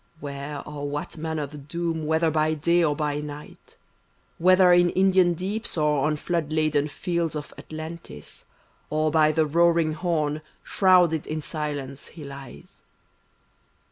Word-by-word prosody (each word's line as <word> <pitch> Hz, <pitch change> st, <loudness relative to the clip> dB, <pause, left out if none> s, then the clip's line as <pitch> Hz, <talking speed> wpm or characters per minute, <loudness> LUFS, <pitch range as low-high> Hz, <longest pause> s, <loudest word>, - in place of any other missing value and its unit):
Where 140 Hz, 0 st, -6 dB
or 145 Hz, -1 st, -5 dB
what 145 Hz, +3 st, -5 dB
manner 160 Hz, -2 st, -3 dB
the 150 Hz, +1 st, -10 dB
doom, 160 Hz, +1 st, -3 dB
whether 160 Hz, +1 st, +2 dB
by 155 Hz, 0 st, +1 dB
day 170 Hz, +3 st, +2 dB
or 150 Hz, -3 st, +2 dB
by 150 Hz, -1 st, -1 dB
night; 150 Hz, 0 st, -10 dB, 0.6 s
Whether 185 Hz, +1 st, +6 dB
in 175 Hz, 0 st, +5 dB
Indian 185 Hz, -1 st, +3 dB
deeps 195 Hz, +4 st, -3 dB
or 150 Hz, -2 st, +2 dB
on 155 Hz, -1 st, 0 dB
flood 165 Hz, -1 st, -2 dB
laden 155 Hz, -2 st, +1 dB
fields 170 Hz, +1 st, -2 dB
of 150 Hz, -1 st, -6 dB
Atlantis, 155 Hz, -, -9 dB, 0.4 s
Or 155 Hz, 0 st, +1 dB
by 155 Hz, 0 st, +4 dB
the 160 Hz, 0 st, +2 dB
roaring 165 Hz, 0 st, +3 dB
Horn, 155 Hz, -3 st, -1 dB, 0.2 s
shrouded 180 Hz, -5 st, +3 dB
in 155 Hz, 0 st, -3 dB
silence 145 Hz, -3 st, -5 dB
he 160 Hz, -, -11 dB
lies. 140 Hz, -, -11 dB
155 Hz, 140 wpm, -25 LUFS, 150-170 Hz, 0.6 s, Whether